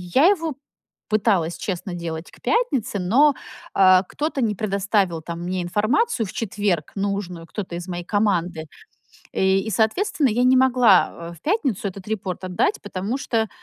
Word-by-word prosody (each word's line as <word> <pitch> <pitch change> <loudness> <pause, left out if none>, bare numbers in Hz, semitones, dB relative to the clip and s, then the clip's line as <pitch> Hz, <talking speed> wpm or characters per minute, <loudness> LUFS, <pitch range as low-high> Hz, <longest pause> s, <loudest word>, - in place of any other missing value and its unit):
я 295 +7 +7
его 330 -8 0 0.5
пыталась 195 -6 +1
честно 185 -1 -4
делать 165 -1 -6
к - - -19
пятнице, 270 - 0
но, 265 +11 +4 0.4
а, 185 -1 +6
кто-то 290 - -3
не 215 -4 +1
предоставил 200 -4 0
там 170 +1 -6
мне 180 +1 -2
информацию 225 - +1
в - - -9
четверг 200 -7 -1
нужную, 195 -4 -3
кто-то 185 -3 -6
из 175 +2 -6
моей 175 -1 -4
команды. 180 -6 0 0.7
И, 190 0 +2
и, - - -2
соответственно, 260 - +1
я 240 +3 +1
не 255 +1 +5
могла, 235 -9 +3
э, - - -10
в 165 - -18
пятницу 265 - 0
этот 195 0 -10 0.4
отдать, 185 +3 0
потому 205 +4 -3
что 225 -4 -1
200 Hz, 155 wpm, -22 LUFS, 180-240 Hz, 0.7 s, я